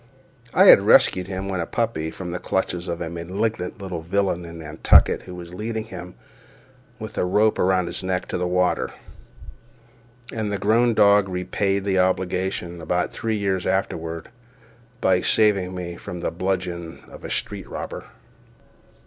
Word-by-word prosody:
I - - +5
had - - +9
rescued 90 -1 +4
him, 95 0 -4
when 95 -2 -2
a 85 - -2
puppy, 110 -10 -1
from 90 +2 -7
the 90 - -3
clutches 90 -1 -2
of 85 0 -4
a 80 - -4
malignant 90 +4 -3
little 95 -4 -5
villain 90 0 -1
in 85 0 -9
Nantucket 80 -1 +4
who 90 - -10
was 85 -1 -9
leading 110 +3 -3
him, 90 -5 -9 0.8
with 110 -2 -6
a - - +2
rope 105 +4 +2
around 95 -1 +2
his - - -3
neck, 95 -1 -2
to - - -2
the 90 - 0
water; 90 0 +1 1.4
and 110 -2 -2
the 100 - -1
grown 115 +3 +3
dog 100 -1 +5
repaid 95 +2 -1
the 95 -2 +2
obligation, 90 -1 -1
about 90 +2 -1
three 110 -1 -2
years 95 -3 -1
afterward, 85 -4 -2 0.7
by 90 -1 +3
saving 100 -4 +3
me 85 -1 -5
from 90 -1 -7
the - - -1
bludgeon 90 -2 -3
of - - -13
a - - -6
street - - -3
robber. - - -6
90 Hz, 160 wpm, -23 LUFS, 85-100 Hz, 1.4 s, had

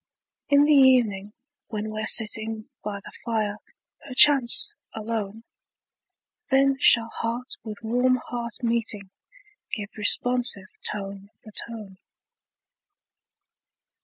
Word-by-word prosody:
In 285 0 +4
the 300 +1 +3
evening, 240 -8 +3 0.4
when 215 -1 -6
we're 215 0 -5
sitting 220 +1 +3
By 205 -1 -6
the - - -11
fire, 215 -3 -3 0.5
perchance 280 - +5 0.2
alone, 220 -1 -6 1.1
Then 270 0 +2
shall 230 -4 +4
heart 235 +3 -5
with 215 -1 -10
warm 250 +3 +1
heart 240 -1 -7
meeting, 225 -4 -3 0.6
Give 205 -2 -4
responsive 230 -1 +3 0.2
tone 200 -1 -8
for 215 - -14
tone. 210 -3 -6
225 Hz, 100 wpm, -23 LUFS, 210-250 Hz, 1.1 s, perchance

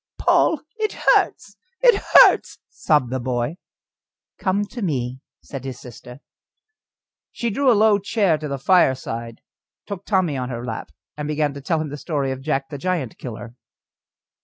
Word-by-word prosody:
"Poll! 310 - +3 0.2
it 430 -1 -1
hurts! - - +1 0.2
it 485 -4 +5
hurts!" - - +7
sobbed 145 -6 +1
the 130 - -1
boy. 125 +5 -2 0.8
"Come 200 +2 0
to 235 +4 -9
me," 130 - -2 0.2
said 135 -3 -8
his 130 -2 -6
sister. 125 +2 -12 1.1
She 235 -1 -3
drew 265 +4 +3
a 225 - +4
low 215 -1 +4
chair 200 -6 +1
to 150 - -5
the 140 -1 -3
fireside, 130 -8 +1 0.4
took 200 -2 -6
Tommy 185 -8 +1
on 125 -1 -3
her 120 -1 -5
lap, 115 -2 -5 0.3
and 150 0 -4
began 150 -1 0
to 140 - -8
tell 160 +3 0
him 155 -1 -3
the 145 - -6
story 145 -3 -2
of 130 0 -5
Jack 135 -1 -2
the 145 - -7
Giant 170 -8 -2
killer. 120 -1 -8
145 Hz, 160 wpm, -22 LUFS, 130-190 Hz, 1.1 s, hurts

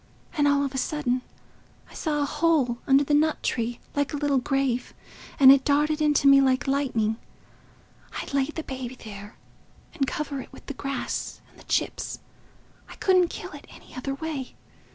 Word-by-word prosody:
And 290 -2 +3
all 285 0 +3
of 275 - -4
a 265 - -1
sudden 255 -3 -1 0.7
I - - -17
saw 295 -3 -1
a - - +1
hole 295 -5 +1
under 275 +1 +5
the 290 - -1
nut 310 +1 +2
tree, 235 0 -1 0.2
like 285 0 0
a - - -1
little 285 -2 +2
grave. 255 -1 -1 0.4
And 265 -1 +10
it 270 -1 +5
darted 300 +2 +2
into 295 -2 +3
me 275 0 +8
like 260 -1 +2
lightning—I'd 250 -2 -4
lay 275 -1 +3
the 315 +2 -6
baby 260 -2 -6
there 205 -2 -10 0.6
and 285 -5 0
cover 300 -4 -3
it - - -13
with - - -14
the 280 - -5
grass 275 -1 -4
and - - -21
the - - -14
chips. - - -1 0.7
I - - -10
couldn't 370 -2 +3
kill 360 - -7
it 290 -1 -11
any - - -15
other 270 +2 -4
way. 290 -4 -5
275 Hz, 175 wpm, -26 LUFS, 260-295 Hz, 0.7 s, And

